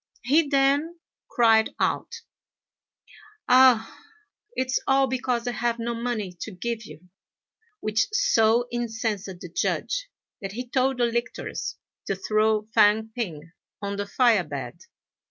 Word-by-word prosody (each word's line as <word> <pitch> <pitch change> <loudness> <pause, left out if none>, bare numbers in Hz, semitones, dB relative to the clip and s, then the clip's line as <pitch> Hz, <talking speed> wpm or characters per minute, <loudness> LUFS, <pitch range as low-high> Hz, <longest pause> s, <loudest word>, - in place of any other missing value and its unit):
He 295 +5 +3
then 285 +4 +1 0.3
cried 225 -2 +3
out, 470 -1 -1 1.3
"Ah! 250 -3 +5 0.6
it's 260 0 0
all 270 0 +4
because 250 -2 -1
I - - +1
have 240 -1 -1
no 235 0 -3
money 230 -5 -3
to - - -4
give 220 +3 -4
you;" 160 +3 -14 0.7
which 215 - +1
so 240 - +3
incensed 225 -4 -2
the 180 -2 -8
Judge, - - -1 0.3
that 195 -1 -5
he 250 +3 -5
told 260 +1 +1
the 240 - +2
lictors 235 +1 -3 0.3
to 195 - 0
throw 215 +2 +1
Fang 220 0 +4
p'ing 165 -9 -5 0.3
on 200 0 -4
the 200 0 -3
fire 230 -4 +3
bed. 140 -2 -7
235 Hz, 130 wpm, -25 LUFS, 210-255 Hz, 1.3 s, Ah